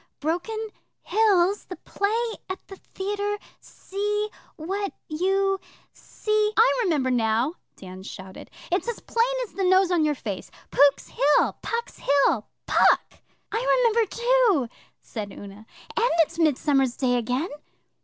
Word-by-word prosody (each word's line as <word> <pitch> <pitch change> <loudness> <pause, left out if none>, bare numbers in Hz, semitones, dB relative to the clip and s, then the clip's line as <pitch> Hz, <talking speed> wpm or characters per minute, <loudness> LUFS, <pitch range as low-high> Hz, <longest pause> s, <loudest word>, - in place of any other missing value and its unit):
Broken 345 +9 -2 0.5
Hills 405 -3 +3
the 365 - -7
play 450 +6 -1 0.2
at 375 - -3
the 390 - -10
theatre 410 +2 -3 0.2
see 415 +2 -3 0.3
what 390 +5 -3
you 385 +4 +1 0.3
see 425 0 -1
' - - -36
'I 465 +3 +5
remember 285 -8 +1
now,' 235 +4 +1 0.2
Dan 185 -1 -10
shouted. 190 0 -10 0.2
'It's 365 +6 0
as 475 - -3
plain 465 +2 +1
as - - -19
the 390 - -2
nose 375 0 +4
on 345 -3 +3
your 300 -1 +1
face 205 -7 -6 0.2
Pook's 285 0 +4
Hill 290 +1 +3
Puck's 465 0 -4
Hill 275 -6 +2 0.2
Puck!' - - +3 0.3
'I - - +2
remember, 455 -1 +3
too,' 475 - +2 0.3
said 210 -3 -6
Una. 205 +2 -11 0.3
'And 470 +2 +3
it's 325 - -8
Midsummer 285 -3 +3
Day 245 0 0
again! 250 +8 -1
370 Hz, 135 wpm, -25 LUFS, 270-420 Hz, 0.5 s, I